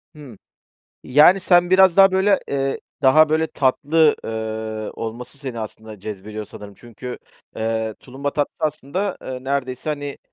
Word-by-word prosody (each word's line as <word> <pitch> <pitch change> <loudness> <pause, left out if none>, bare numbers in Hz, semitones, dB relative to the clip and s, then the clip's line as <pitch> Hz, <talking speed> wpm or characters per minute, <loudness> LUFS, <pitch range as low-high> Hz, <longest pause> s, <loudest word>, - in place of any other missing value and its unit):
Hı, 135 -9 -12 0.7
yani, 155 +9 +6
sen 175 -1 +4
biraz 190 -1 +5
daha 195 -1 +7
böyle, 190 +1 +3
eee, 135 -1 -1 0.2
daha 155 +4 +6
böyle 160 +1 +1
tatlı, 150 +2 +2
eee, 110 -1 -4
olması 120 +4 -6
seni 130 -5 -6
aslında 110 -1 -8
cezbediyor, 105 +1 -7
sanırım. 100 0 -11
Çünkü, 120 +2 -9 0.4
eee, 110 -1 -2
tulumba 135 +2 -5
tatlısı, 145 -1 -2
aslında, 155 +7 -3
eee, 130 0 -7
neredeyse, 135 +1 -2
hani, 145 -1 -5
135 Hz, 140 wpm, -21 LUFS, 110-155 Hz, 0.7 s, daha